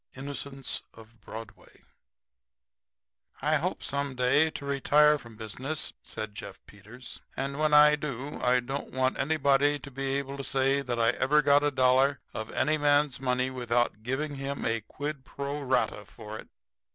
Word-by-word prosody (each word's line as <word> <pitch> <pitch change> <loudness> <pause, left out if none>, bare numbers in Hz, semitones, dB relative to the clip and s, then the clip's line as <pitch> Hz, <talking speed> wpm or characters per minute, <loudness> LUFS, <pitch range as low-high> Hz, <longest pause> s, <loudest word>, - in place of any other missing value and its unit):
INNOCENTS 135 0 -3
OF 115 0 -16
BROADWAY 110 +1 -11 1.6
"I 155 +2 +2
hope 175 +5 -3
some 140 -1 -2
day 125 +5 +3
to 145 - -7
retire 150 +2 +4
from 115 -3 -13
business," 130 +8 -4
said 110 -1 -5
Jeff 100 -2 -9
Peters; 105 +5 -11 0.2
"and 140 +2 -3
when 155 0 +2
I 150 0 +7
do 140 -1 -5
I 125 0 +3
don't 135 +3 -5
want 130 0 0
anybody 145 0 +3
to 140 -1 -11
be 135 +1 -2
able 140 0 -3
to 140 - -5
say 135 +1 +1
that 125 -3 -3
I 115 0 +4
ever 150 +4 +2
got 145 +1 +5
a 145 - +3
dollar 130 0 +3
of 110 0 -5
any 155 0 +1
man's 145 -2 +3
money 130 0 0
without 120 -3 0
giving 135 +6 -2
him 140 0 -4
a 115 0 0
quid 145 +5 -6
pro 140 +2 -5
rata 130 -5 0
for 110 +1 -9
it. - - -12
135 Hz, 165 wpm, -28 LUFS, 125-145 Hz, 1.6 s, I